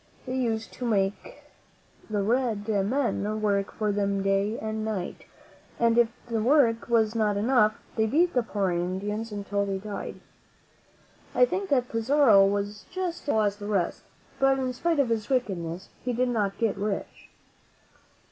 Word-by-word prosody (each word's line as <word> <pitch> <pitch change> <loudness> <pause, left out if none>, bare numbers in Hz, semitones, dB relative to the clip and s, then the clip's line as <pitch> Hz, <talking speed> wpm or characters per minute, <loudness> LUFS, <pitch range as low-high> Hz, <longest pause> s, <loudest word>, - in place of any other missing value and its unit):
They 255 -1 -3
used 225 -3 -1
to - - -8
make 195 -3 -1 0.7
the 205 -2 0
red 225 -2 0
men 215 0 0
work 200 -2 0
for 210 -1 -1
them 200 -1 0
day 195 +3 +1
and 220 0 -3
night, 210 -5 -4 0.5
and 230 -1 +3
if 235 -1 +4 0.2
the 230 -2 -1
work 240 -2 +3
was 225 -2 +3
not 215 -3 +1
enough, 215 -1 +3 0.2
they 220 -1 +2
beat 335 +9 +2
the 250 - +3
poor 200 -5 -1
Indians 195 +6 -2
until 200 0 -2
they 195 -1 -2
died. 205 +1 -6 1.2
I - - +6
think 390 -4 -3
that 250 -3 +2
Pizarro 230 -3 +5
was 205 +1 -3
just 360 -2 -3
as - - -21
cruel 220 -6 +3
as 205 -1 0
the 205 0 -7
rest; 195 -5 0 0.4
but 270 0 +4
in 260 -1 -1
spite 330 +6 0
of 270 -4 +2
his 220 -2 -1
wickedness 190 -9 -2
he 250 - -1
did 250 +2 +1
not 205 -4 -1
get 225 -4 0
rich. 200 0 -4
215 Hz, 165 wpm, -27 LUFS, 200-245 Hz, 1.2 s, I